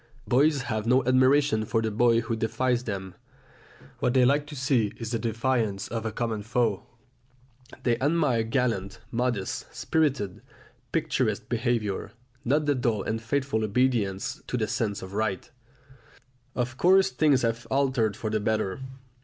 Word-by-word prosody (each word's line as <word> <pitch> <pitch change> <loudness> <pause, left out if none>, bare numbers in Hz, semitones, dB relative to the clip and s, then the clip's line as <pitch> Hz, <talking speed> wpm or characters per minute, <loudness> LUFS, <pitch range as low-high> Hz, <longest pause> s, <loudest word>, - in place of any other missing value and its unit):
Boys 140 +3 +3
have 110 -1 -3
no 125 +1 +3
admiration 130 -2 +4
for 115 +1 0
the 110 -1 -1
boy 115 +1 +3
who 115 0 -2
defies 125 +2 0
them; 95 -3 -4 0.9
what 125 - +1
they 130 -1 +6
like 145 +3 +2
to 150 - -8
see 130 -6 +1
is 115 0 -5
the 115 - -1
defiance 115 -3 -1
of 115 0 -3
a - - -2
common 110 -1 -2
foe. 115 -2 0 1.0
They 120 -1 +1
admire 145 -4 +2
gallant, 110 -4 -1
modest, 120 -5 -2
spirited, 140 - -1 0.5
picturesque - - 0
behaviour, 115 -4 -1 0.3
not 145 +5 +1
the 145 - +3
dull 115 -6 0
and 110 +1 -2
faithful 125 -1 -1
obedience 110 -3 0
to 125 - -2
the 110 - 0
sense 105 -2 -2
of 95 +1 -9
right. 100 -3 -2 1.0
Of 130 +1 -2
course 190 -5 +5
things 135 0 +3
have 115 +1 -1
altered 130 -6 +1
for 110 - -3
the 110 - +1
better. 110 0 -1
115 Hz, 150 wpm, -27 LUFS, 110-130 Hz, 1.0 s, they